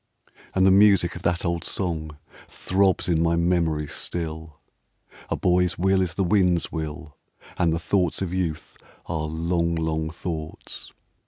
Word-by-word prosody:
And 95 Hz, 0 st, +4 dB
the 95 Hz, -, +6 dB
music 100 Hz, -3 st, +5 dB
of 90 Hz, -, -7 dB
that 85 Hz, +2 st, 0 dB
old 85 Hz, -1 st, -1 dB
song 80 Hz, -6 st, -3 dB, 0.3 s
Throbs 95 Hz, 0 st, +1 dB
in 85 Hz, -2 st, +2 dB
my 85 Hz, 0 st, +2 dB
memory 85 Hz, -3 st, +1 dB
still: 80 Hz, 0 st, -5 dB, 0.7 s
"A -, -, 0 dB
boy's 90 Hz, 0 st, +2 dB
will 95 Hz, +1 st, +3 dB
is 90 Hz, -2 st, -1 dB
the 100 Hz, -, +1 dB
wind's 90 Hz, -2 st, +2 dB
will, 80 Hz, -2 st, -6 dB, 0.4 s
And 85 Hz, -2 st, +3 dB
the 80 Hz, -, +1 dB
thoughts 90 Hz, 0 st, 0 dB
of 95 Hz, -2 st, -3 dB
youth 85 Hz, -4 st, -3 dB, 0.3 s
are 80 Hz, -2 st, -2 dB
long, 85 Hz, +1 st, 0 dB
long 80 Hz, -1 st, -1 dB
thoughts." 80 Hz, -2 st, -6 dB
85 Hz, 150 wpm, -24 LUFS, 80-90 Hz, 0.7 s, the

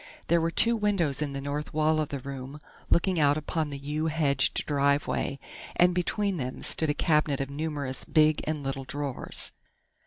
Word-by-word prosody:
There 170 Hz, 0 st, +4 dB
were 165 Hz, -, +1 dB
two 235 Hz, +7 st, +5 dB
windows 195 Hz, -, +1 dB
in 145 Hz, -2 st, -2 dB
the 140 Hz, -, -4 dB
north 145 Hz, +2 st, -4 dB
wall 155 Hz, 0 st, +2 dB
of 155 Hz, -, -1 dB
the 140 Hz, -, -3 dB
room, 135 Hz, +1 st, -7 dB, 0.3 s
looking 180 Hz, 0 st, +2 dB
out 145 Hz, -1 st, +4 dB
upon 155 Hz, 0 st, -2 dB
the 140 Hz, -, -5 dB
yew 150 Hz, +3 st, -2 dB
hedged 150 Hz, -4 st, +1 dB
driveway, 140 Hz, -1 st, 0 dB, 0.4 s
and 175 Hz, 0 st, +4 dB
between 190 Hz, +2 st, 0 dB
them 130 Hz, -3 st, -5 dB
stood 160 Hz, -, 0 dB
a 145 Hz, -, +1 dB
cabinet 150 Hz, -3 st, +2 dB
of 135 Hz, 0 st, -3 dB
numerous 145 Hz, -3 st, -3 dB
big 155 Hz, -1 st, +3 dB
and 150 Hz, -2 st, -2 dB
little 135 Hz, 0 st, -3 dB
drawers. 140 Hz, 0 st, -1 dB
150 Hz, 180 wpm, -28 LUFS, 140-160 Hz, 0.4 s, two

